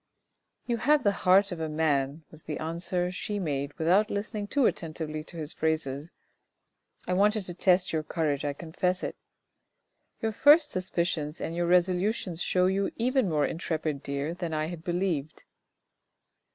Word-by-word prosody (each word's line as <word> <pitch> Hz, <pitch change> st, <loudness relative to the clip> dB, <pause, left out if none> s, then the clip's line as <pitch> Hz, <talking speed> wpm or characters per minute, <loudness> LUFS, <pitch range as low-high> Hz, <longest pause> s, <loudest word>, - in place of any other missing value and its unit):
" -, -, -51 dB
You 240 Hz, -1 st, 0 dB
have 295 Hz, +5 st, +3 dB
the 205 Hz, -, +4 dB
heart 195 Hz, +1 st, +4 dB
of 175 Hz, -, -5 dB
a 160 Hz, -1 st, -2 dB
man," 150 Hz, -1 st, 0 dB
was 155 Hz, -, -6 dB
the 155 Hz, -, -5 dB
answer 175 Hz, +2 st, -2 dB
she 205 Hz, +3 st, -4 dB
made 145 Hz, -6 st, -2 dB
without 185 Hz, +6 st, +3 dB
listening 205 Hz, 0 st, -3 dB
too 280 Hz, +3 st, +2 dB
attentively 155 Hz, -4 st, -2 dB
to 170 Hz, -, -8 dB
his 155 Hz, -2 st, -4 dB
phrases; 155 Hz, -2 st, -2 dB, 0.5 s
" -, -, -37 dB
I 180 Hz, -, 0 dB
wanted 210 Hz, +3 st, +3 dB
to 180 Hz, -, -6 dB
test 180 Hz, 0 st, +2 dB
your 160 Hz, -, +1 dB
courage, 155 Hz, -3 st, -1 dB
I 145 Hz, -1 st, -1 dB
confess 180 Hz, +4 st, -2 dB
it. -, -, -3 dB, 1.0 s
Your 225 Hz, -, -1 dB
first 295 Hz, +6 st, +6 dB
suspicions 170 Hz, -4 st, -1 dB
and 165 Hz, -, -4 dB
your 175 Hz, 0 st, 0 dB
resolutions 180 Hz, 0 st, +2 dB
show 180 Hz, 0 st, +2 dB
you 195 Hz, +1 st, +1 dB
even 250 Hz, -2 st, +1 dB
more 150 Hz, -3 st, +2 dB
intrepid, 155 Hz, -3 st, -2 dB
dear, 140 Hz, +3 st, -3 dB
than 170 Hz, -2 st, -4 dB
I 155 Hz, +1 st, -1 dB
had 170 Hz, -2 st, -7 dB
believed." 175 Hz, -5 st, -2 dB
175 Hz, 165 wpm, -28 LUFS, 155-195 Hz, 1.0 s, first